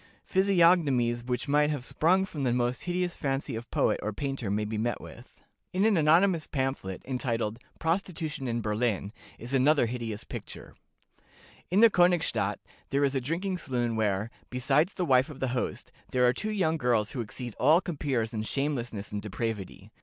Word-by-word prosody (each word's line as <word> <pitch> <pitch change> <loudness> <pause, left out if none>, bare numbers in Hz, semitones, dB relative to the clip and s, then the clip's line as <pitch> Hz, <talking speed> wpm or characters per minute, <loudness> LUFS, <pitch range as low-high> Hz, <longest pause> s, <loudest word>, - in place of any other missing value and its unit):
Physiognomies 170 -11 +3
which 125 +2 -2
might 150 +1 +3
have 145 -5 -3
sprung 185 +7 +2
from 155 -6 -6
the 130 -3 +1
most 120 0 0
hideous 180 0 -1
fancy 135 -4 -2
of 115 +1 -7
poet - - +1
or 105 - -2
painter 135 -1 -3
may 105 +1 0
be 110 +1 -4
met 120 +1 -1
with." - - -13 0.3
In 190 +3 +2
an 220 -2 +4
anonymous 165 +2 +4
pamphlet, 130 -9 -3
entitled 120 -4 -2 0.2
"Prostitution 160 -4 -2
in 120 0 -1
Berlin," 105 -1 -1 0.2
is 120 +4 -7
another 140 +1 +4
hideous 115 -3 -4
picture: - - -9 1.0
"In 190 +4 +3
the 230 -1 +8
Königstadt 175 -2 +2 0.3
there 140 +1 +1
is 140 -1 +2
a 135 - 0
drinking 180 +7 -2
saloon 120 -6 -1
where, 105 0 0 0.2
besides 135 +8 +1
the 180 - -1
wife 130 -2 +4
of 140 -3 -9
the 130 - -1
host, 125 0 -3 0.2
there 125 -1 +2
are 125 - +4
two 215 - -3
young 170 -6 +1
girls 120 -6 +1
who 125 - -3
exceed 120 +1 -6
all 155 +6 +6
compeers 135 -10 -2
in 110 - -2
shamelessness 120 -4 -3
and 105 0 -3
depravity. 105 -1 -5
130 Hz, 175 wpm, -28 LUFS, 115-160 Hz, 1.0 s, the